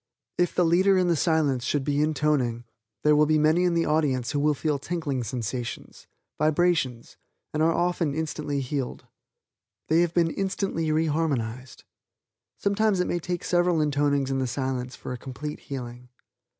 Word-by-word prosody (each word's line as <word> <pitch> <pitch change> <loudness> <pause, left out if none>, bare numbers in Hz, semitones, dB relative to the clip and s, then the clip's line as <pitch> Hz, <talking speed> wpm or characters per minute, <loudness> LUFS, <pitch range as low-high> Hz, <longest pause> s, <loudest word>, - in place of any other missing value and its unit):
If 175 - +1
the 180 - +3
leader 185 +4 +4
in 180 -1 +2
the 170 - +3
Silence 150 -6 +1
should 140 +2 0
be 145 +1 0
intoning, 150 -6 +1 0.4
there 150 0 +5
will 150 0 +4
be 155 0 +3
many 155 +4 +3
in 175 -1 +2
the 165 - +2
audience 145 -5 +1
who 145 - 0
will 150 +1 +2
feel 150 0 -1
tinkling 145 -5 -3
sensations 120 +1 -5 0.3
vibrations 155 -6 +1 0.4
and 155 - 0
often 165 -1 +1
are - - -4
instantly 150 -3 -2
healed. 135 0 -4 0.8
They 160 +2 +4
have 175 -1 0
been 170 -2 +3
instantly 190 -4 -1
re 160 +1 +2
harmonized. 130 -6 -2 0.7
Sometimes 200 -1 +1
it 180 - +2
may 175 - -1
take 175 +1 -4
several 175 -1 +2
intonings 145 -2 +1
in 135 - 0
the 130 - 0
Silence 125 0 -3
for - - -6
a 125 - -7
complete 145 +4 -6
healing. 125 -3 -8
150 Hz, 165 wpm, -26 LUFS, 130-170 Hz, 0.8 s, there